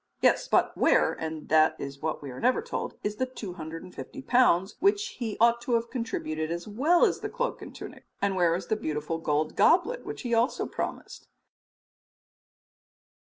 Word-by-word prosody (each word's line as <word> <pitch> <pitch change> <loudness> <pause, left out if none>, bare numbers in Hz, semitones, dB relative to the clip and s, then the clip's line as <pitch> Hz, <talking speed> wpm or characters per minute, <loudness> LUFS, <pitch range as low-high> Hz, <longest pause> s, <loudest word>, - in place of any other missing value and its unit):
Yes, - - +3
but - - +2
where 75 0 +3
and 160 -1 -6
that 155 0 +5
is 140 0 -7
what 155 -1 -3
we 140 - -6
are 125 - -8
never 255 - +2
told 480 - -4
is 210 0 -2
the 255 - 0
250 180 - -8
pounds 215 -8 +3
which 405 +1 +2
he 225 -4 -3
ought 235 +1 +4
to 240 - -2
have 230 0 -1
contributed 160 - -3
as 170 +2 -4
well 290 +12 +3
as - - 0
the - - -4
cloak - - -3
and - - -10
tunic? - - -10
And 200 -1 0
where 175 -2 +3
is 185 - -4
the 220 - 0
beautiful 155 -4 -3
gold 155 -1 0
goblet 415 +9 +3
which - - -7
he 245 - -3
had 230 - +3
also 240 +4 0
promised? - - -6
200 Hz, 180 wpm, -28 LUFS, 160-250 Hz, -, that